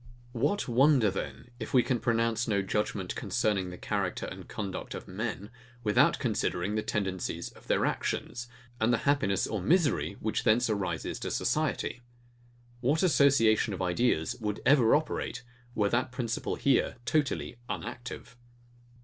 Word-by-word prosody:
] 120 0 -25
What 145 - 0
wonder, 125 -3 +4
then, 120 - -6
if - - -4
we 125 - +6
can 125 -3 0
pronounce 115 0 +1
no 100 -3 +1
judgement 95 -1 -2
concerning 100 -4 0
the 90 - -8
character - - -2
and - - -8
conduct 100 -3 -5
of - - -8
men, 105 +1 -4 0.3
without 105 -2 +4
considering 90 +4 -1
the 110 - 0
tendencies 95 -4 -3
of - - -18
their - - +2
actions, 120 0 -2 0.3
and 110 +2 +3
the 120 - +3
happiness 110 -9 +2
or 110 -3 -3
misery 160 - +2
which - - -1
thence 115 +1 +3
arises 90 -7 -2
to - - -3
society? 120 - -1 0.8
What 140 +7 +1
association 130 - +4
of 95 - -6
ideas 90 -3 +1
would 105 -1 -2
ever 130 -4 +6
operate, 145 -4 -2 0.3
were 105 -1 +2
that 120 +3 0
principle 120 -3 -2
here 135 -2 +2
totally 135 -1 0
unactive. 120 +1 -6
115 Hz, 150 wpm, -29 LUFS, 100-125 Hz, 0.8 s, we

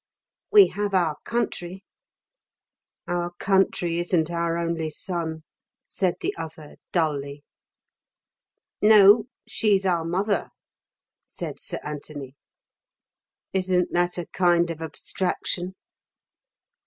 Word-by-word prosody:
"We 410 -2 +8
have 205 -1 -2
our 165 -5 +2
country." 195 -5 -3 1.2
"Our 175 0 -2
country 180 -2 +1
isn't 175 -2 +1
our 170 0 0
only 165 -2 -1
son," 160 0 -4 0.4
said 185 -3 -1
the - - -1
other 160 -2 -8
dully. 145 -4 -1 1.4
"No. 210 0 +7 0.2
She's 200 -3 +2
our 175 -3 +2
mother," 190 +4 0 0.8
said - - -7
Sir - - -3
Anthony. 145 -2 -7 1.2
"Isn't 185 -2 +1
that 175 +1 +1
a 175 - -3
kind 175 -1 +2
of 165 -1 -7
abstraction?" 180 +3 -2
175 Hz, 95 wpm, -25 LUFS, 160-190 Hz, 1.4 s, We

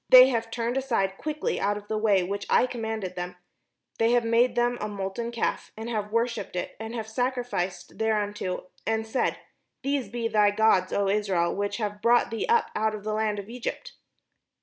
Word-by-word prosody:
They 255 0 +10
have 230 -3 -1
turned 235 +2 -1
aside 195 -8 0
quickly 305 0 -2
out 205 +1 +1
of 205 0 -10
the 220 - -2
way 205 -4 +3
which 200 +2 -4
I - - +5
commanded 220 -6 -4
them; 180 0 -4 0.6
they 230 +1 +4
have 240 -1 +4
made 235 +2 +3
them 240 0 +1
a 210 - -1
molten 200 +3 -4
calf, 235 - -2
and 220 +1 -5
have 210 -2 -2
worshipped 230 -3 -1
it, 180 - -3
and 225 +1 -5
have 220 -2 -4
sacrificed 230 -7 -2
thereunto, 205 -4 -1 0.2
and 220 0 +1
said, 225 +4 0 0.5
'These 275 -5 -1
be 235 +1 -2
thy 210 -2 +4
gods, 205 -3 +3
O 200 -1 +1
Israel, 195 -4 +1
which 200 0 -1
have 205 -2 -3
brought 240 0 +4
thee 225 - -2
up 465 0 +3
out 215 0 +1
of 210 - -8
the 215 0 -2
land 215 -1 0
of 200 -1 -6
Egypt.'" 240 +1 -5
220 Hz, 195 wpm, -27 LUFS, 205-235 Hz, 0.6 s, They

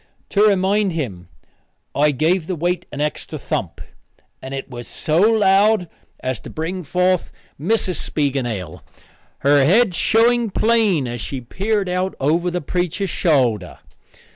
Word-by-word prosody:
To 200 - +1
remind 200 -1 +3
him 100 - -4 0.7
I 150 +1 +3
gave 155 +5 +1
the 185 - -2
weight 175 +2 -2
an 145 - -5
extra 150 0 -3
thump, - - -4 0.6
and 130 - -8
it 135 -1 -5
was 120 -2 -8
so 155 +1 0
loud 205 -2 +4 0.3
as 130 -3 -2
to - - -10
bring 170 +4 -4
forth 180 +3 0 0.3
Mrs. 185 0 +1
Spiegelnail, 120 - -2 0.6
her 140 0 +4
head 195 - +4
showing 230 +5 +3
plain 210 - +2
as 120 -1 -5
she 135 +6 -4
peered 195 - -2
out 180 +1 -1
over 165 +6 +1
the 180 0 -3
preacher's 180 +4 -2
shoulder. 130 - +1
175 Hz, 140 wpm, -20 LUFS, 140-195 Hz, 0.7 s, loud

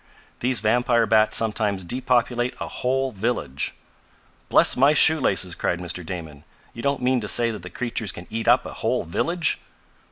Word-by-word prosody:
"These 125 0 +1
vampire 120 +1 +2
bats 110 0 +3
sometimes 105 -3 -1
depopulate 120 +2 0
a - - -4
whole 135 +1 -1
village." 100 - -2 0.7
"Bless - - +5
my 140 +4 +4
shoe 160 +1 +4
laces!" 95 -8 +1
cried 90 - -1
Mr. 90 0 -4
Damon. 80 -4 -7 0.3
"You 115 - -8
don't 140 -1 -1
mean 125 -1 +2
to 105 - -5
say 115 +2 +3
that 105 -4 -7
the 90 - -9
creatures 115 0 -3
can 85 - -10
eat 115 0 -3
up - - +4
a - - -7
whole - - -1
village?" 165 - -1
115 Hz, 170 wpm, -23 LUFS, 95-125 Hz, 0.7 s, Bless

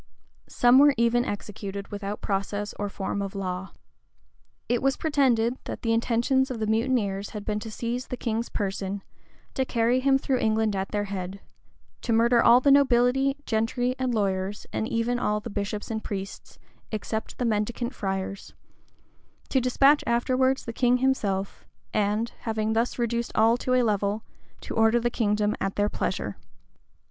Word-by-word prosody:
Some 245 +2 +5
were 285 0 +6
even 235 +1 +3
executed 200 -1 -5
without 205 0 -5
process 205 +1 -2
or 205 0 -2
form 200 0 -3
of 195 0 -5
law.[] 185 -1 -4 1.0
It 245 -1 +1
was 270 0 +1
pretended, 255 -6 +2
that - - -6
the 225 -1 +2
intentions 240 +4 +2
of 250 -3 -4
the 215 - 0
mutineers 220 -3 0
had 205 - -7
been 210 -1 -1
to 220 - -7
seize 235 +3 -4
the 250 - -5
king's 230 -1 -2
person, 195 -1 -3 0.5
to 265 - 0
carry 240 0 +1
him 270 +1 +4
through 265 -1 0
England 220 -1 +1
at 190 0 -2
their 205 -1 -1
head; 195 -1 -5 0.6
to 235 - -1
murder 235 +1 +4
all 235 +1 +7
the 280 +2 +4
nobility, 270 0 +4
gentry, 245 +3 0
and 255 -1 0
lawyers, 195 -1 -1
and 220 - -1
even 230 +2 0
all 210 -3 0
the 210 - -8
bishops 205 +2 -4
and 220 -1 -3
priests, 195 -1 -6 0.3
except 220 0 -4
the 250 - -1
mendicant 235 +3 -1
friars; 195 -2 -4 0.9
to 265 - +2
despatch 275 +4 +4
afterwards 255 +3 +1
the 230 - -5
king 245 +1 +3
himself, 205 -7 -1 0.3
and, 215 +2 0
having 220 -1 -1
thus 230 +2 0
reduced 235 -1 -1
all 225 +2 +5
to 255 +1 0
a 250 - +4
level, 210 -1 0 0.4
to - - -6
order 225 +1 +4
the 240 +1 0
kingdom 210 -2 +1
at 195 - -1
their 205 0 +1
pleasure. 105 - -3
225 Hz, 165 wpm, -26 LUFS, 205-245 Hz, 1.0 s, all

